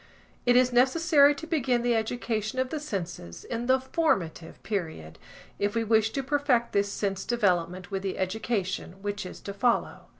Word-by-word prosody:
It 245 - +5
is 250 0 +4
necessary 285 +3 +5
to 325 - -7
begin 260 -7 +1
the 240 0 +2
education 220 0 -2
of 260 0 0
the 310 - -2
senses 175 - -6
in 235 +1 -4
the 260 0 +4
formative 225 - -1
period, 160 - -4 0.4
if 205 +2 0
we 230 - +1
wish 220 0 +3
to 275 - -2
perfect 275 -4 +1
this 200 0 +1
sense 195 -2 -2
development 185 -5 0
with 195 -1 -2
the 195 -1 -3
education 195 -1 -3
which 205 -2 -3
is - - -10
to 200 - -6
follow. 235 +4 0
220 Hz, 170 wpm, -27 LUFS, 195-255 Hz, 0.4 s, It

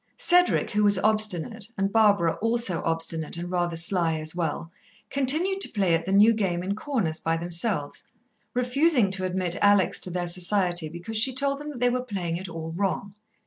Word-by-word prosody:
Cedric, 355 0 +2
who 210 -1 +1
was 205 -1 +4
obstinate, 215 0 -1
and 195 +1 -1
Barbara, 200 -7 +3
also 225 -7 -1
obstinate 165 0 -2
and 175 +1 -6
rather 175 -2 -1
sly 165 -1 0
as 155 0 -4
well, 165 -1 -4 0.4
continued 315 +9 +1
to - - +5
play 195 -5 0
at 165 +1 -1
the - - -1
new 210 +4 +5
game 185 -5 -2
in 195 +2 -2
corners 210 - -2
by 165 0 -1
themselves, 170 -2 -1 0.5
refusing 250 - +2
to 190 -1 -1
admit 180 -1 -2
Alex 205 -3 +3
to - - 0
their 180 0 -3
society 175 -1 0
because 175 +7 -3
she 245 +4 +5
told 280 +1 0
them 295 +1 -7
that 280 -5 -8
they 245 0 +2
were 250 +1 -1
playing 185 -8 -4
it 185 0 -7
all 165 -1 -6
wrong. 195 +2 -3
190 Hz, 185 wpm, -25 LUFS, 170-225 Hz, 0.5 s, to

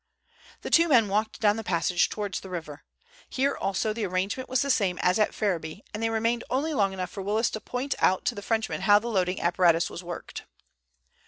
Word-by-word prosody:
The - - -6
two 335 +1 +5
men 235 -9 +4
walked 215 +2 -1
down 210 -1 +3
the 225 - -4
passage 175 -1 +1
towards 205 -3 -3
the 190 - -11
river. 160 -5 -7 0.5
Here 275 +2 0
also 195 +3 -1
the 225 0 -4
arrangement 195 +8 -2
was 260 +1 +2
the 280 - +1
same 190 -7 +1
as 180 +4 +3
at 215 - +3
Ferriby, 180 -3 -3
and 210 - -4
they 225 - +1
remained 230 +1 0
only 290 +5 0
long 200 -7 +2
enough 185 -1 -5
for 200 - -6
Willis 215 +4 0
to 215 - -5
point 260 +3 -3
out 185 - +2
to - - +1
the 205 - -7
Frenchman 225 +1 -1
how 205 -1 +6
the 230 +3 -3
loading 185 -4 0
apparatus 170 -1 +2
was 175 - -7
worked. 175 0 -7
205 Hz, 215 wpm, -27 LUFS, 185-225 Hz, 0.5 s, how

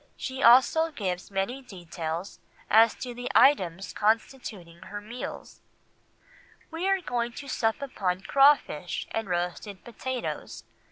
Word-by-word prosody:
She 260 0 -5
also 265 +7 +6
gives 190 - -4
many 200 +7 -2
details 175 -4 -6 0.3
as 225 +1 +6
to 250 -1 -6
the 245 +1 -5
items 190 - +3
constituting 210 -5 -2
her 205 - -7
meals: 225 +4 -8 1.1
"We 335 +4 -2
are 390 -1 +2
going 240 -6 -2
to 280 - -9
sup 225 -1 -1
upon 190 -9 -2
crawfish 275 - +3
and 225 -3 -3
roasted 180 +3 -3
potatoes. 250 +2 -5
225 Hz, 120 wpm, -27 LUFS, 185-260 Hz, 1.1 s, also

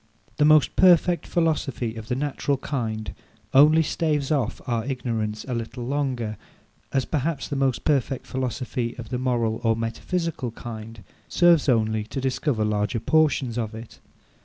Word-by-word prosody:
The 150 - +4
most 155 -1 +5
perfect 175 -1 +4
philosophy 145 -9 0
of 110 -1 -8
the 125 - -1
natural 140 0 -1
kind 115 -6 -3 0.4
only 155 +4 +7
staves 150 -3 -1
off 135 -7 0
our 115 -2 -1
ignorance 115 -5 -3
a 130 - -3
little 120 +1 -4
longer: 125 -5 -2 0.5
as 135 -1 +1
perhaps 150 -1 -2
the 145 - -4
most 135 -2 0
perfect 135 -3 0
philosophy 125 -2 -3
of 115 -3 -8
the 125 -1 -2
moral 120 -3 0
or 115 -1 +3
metaphysical 125 +6 -3
kind 115 -2 -9 0.2
serves 170 -4 +4
only 110 -3 +2
to 135 - -5
discover 130 -3 0
larger 105 +1 0
portions 130 -2 +2
of 110 -1 -3
it. 115 0 -10
125 Hz, 150 wpm, -24 LUFS, 115-145 Hz, 0.5 s, only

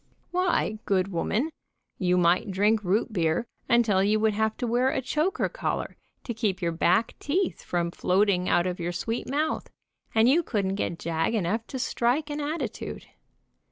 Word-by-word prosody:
Why, 355 -12 +1
good 190 -1 +1
woman, 210 - -1 0.5
you 180 -1 +2
might 175 +3 +3
drink 210 +3 +2
root 205 +5 0
beer 170 +4 +1 0.2
until 220 -5 +4
you 210 +2 +2
would 215 0 +2
have 220 +1 0
to - - -2
wear 245 +3 +2
a - - 0
choker 305 +8 0
collar - - -3 0.3
to 235 - -4
keep 215 -4 -1
your 170 -2 0
back 180 +6 +2
teeth 350 +5 -1
from 170 -1 -1
floating 185 0 +2
out 175 - +3
of 180 0 -2
your 175 +1 -2
sweet 225 +7 -3
mouth, 300 +3 -1 0.5
and 220 +1 +5
you 300 +7 +5
couldn't 200 - -1
get 175 -4 -2
jag 165 +7 -1
enough 220 +3 -1
to 265 - -5
strike 260 +4 0
an 295 +1 -3
attitude. 305 +3 -4
215 Hz, 170 wpm, -27 LUFS, 180-250 Hz, 0.5 s, and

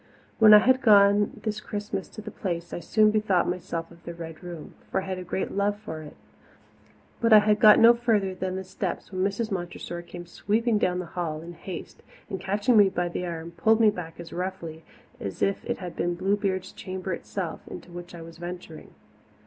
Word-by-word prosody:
When 220 -1 +8
I 210 - +12
had 260 +4 +4
gone 205 -3 +5
this 215 -1 -2
Christmas 205 -2 -4
to 215 - -10
the 215 - -7
Place 170 -4 -4
I - - -3
soon 215 +4 +3
bethought 210 -5 +2
myself 170 -2 -4
of 170 0 -17
the 170 - -7
Red 165 -2 -8
Room 170 -3 -8 0.2
for - - 0
I - - -5
had 190 -1 -4
a - - -6
great 180 +2 -3
love 205 +1 0
for 160 -7 -7
it. 150 - -11 1.0
But 230 -1 +2
I - - +11
had 210 0 +4
got 210 -1 +8
no 230 +1 +8
further 220 -5 +1
than 185 0 -3
the 190 - -4
steps 190 0 -5
when 185 -1 -1
Mrs. 205 +3 -1
Montressor 175 -1 -5
came 175 0 -10
sweeping 215 +5 0
down 180 -2 +1
the 180 - -3
hall 165 -3 -4
in 170 +1 -9
haste 170 +1 -8 0.3
and, 190 - -3
catching 210 +5 +2
me 205 -2 +7
by 175 -1 -1
the 180 +1 -4
arm, 165 0 -6
pulled 220 +7 +3
me 220 -2 +6
back 170 -4 -8
as 170 - -9
roughly 175 -3 -5 0.4
as 100 - -4
if 195 0 0
it - - -2
had 180 -3 -7
been 175 0 -1
Bluebeard's 190 0 -1
chamber 185 0 -5
itself 170 -1 -5
into 180 - -9
which 175 0 -9
I 165 - -9
was 165 0 -12
venturing. 175 -2 -8
185 Hz, 210 wpm, -26 LUFS, 175-210 Hz, 1.0 s, I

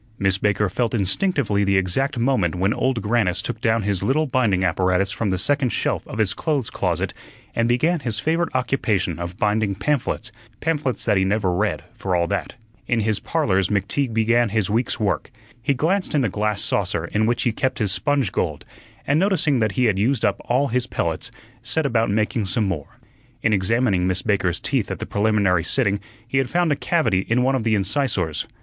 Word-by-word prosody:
Miss 95 -1 +2
Baker 105 0 +1
felt 115 +4 -1
instinctively 105 - +1
the 100 -1 +2
exact 95 +9 0
moment 115 -9 +1
when 95 +4 +1
Old 130 -5 -1
Grannis 105 -5 +1
took 120 -2 -4
down 115 -2 +2
his 100 -2 0
little 155 +5 +1
binding 115 -9 +1
apparatus 95 +2 +1
from 100 +2 -2
the 95 - 0
second 140 +6 +1
shelf - - 0
of - - -7
his 110 -3 +2
clothes 140 -8 -1
closet - - -1 0.4
and 115 0 +1
began 160 +8 +2
his 115 -6 -3
favorite 165 +6 0
occupation 105 -9 0
of 85 +1 -5
binding 105 -1 +1
pamphlets 115 +1 -1 0.3
pamphlets 150 -5 -1
that 105 -3 +3
he 95 - +3
never 95 -1 +1
read, 105 +4 -1
for 100 -5 -2
all 85 -1 +2
that. 100 +2 -3 0.3
In 120 -2 +1
his 110 -1 0
"Parlors" 95 - 0
McTeague 105 +6 0
began 115 +1 +2
his 105 -2 0
week's 115 +4 0
work. 100 -9 -1 0.3
He 140 +3 +1
glanced 180 +6 0
in 145 - +3
the 120 - +1
glass 105 +1 -1
saucer 90 -4 -1
in 105 +5 0
which 120 0 +1
he 120 - +2
kept 130 +4 -1
his 105 -5 0
sponge 135 0 +1
gold, 80 -7 -2 0.4
and 145 +2 +2
noticing 165 -8 +2
that 110 -3 +1
he 125 - +2
had 100 -4 +2
used 125 +6 +1
up - - 0
all 135 +4 +1
his 125 +1 0
pellets, - - -2 0.3
set 160 -2 0
about 115 -4 +1
making 105 0 0
some 105 +4 +1
more. 80 -7 -5 0.5
In 110 - +3
examining 100 -1 +2
Miss 95 0 0
Baker's 95 -5 0
teeth - - -1
at - - -3
the - - -5
preliminary 100 -5 +2
sitting 100 0 +1 0.3
he 135 +3 +1
had 130 -2 0
found 175 0 +1
a - - +3
cavity 125 - +1
in 125 +2 +3
one 135 +1 +2
of 130 -4 0
the 110 -1 +2
incisors. 100 - 0
110 Hz, 200 wpm, -22 LUFS, 95-130 Hz, 0.5 s, that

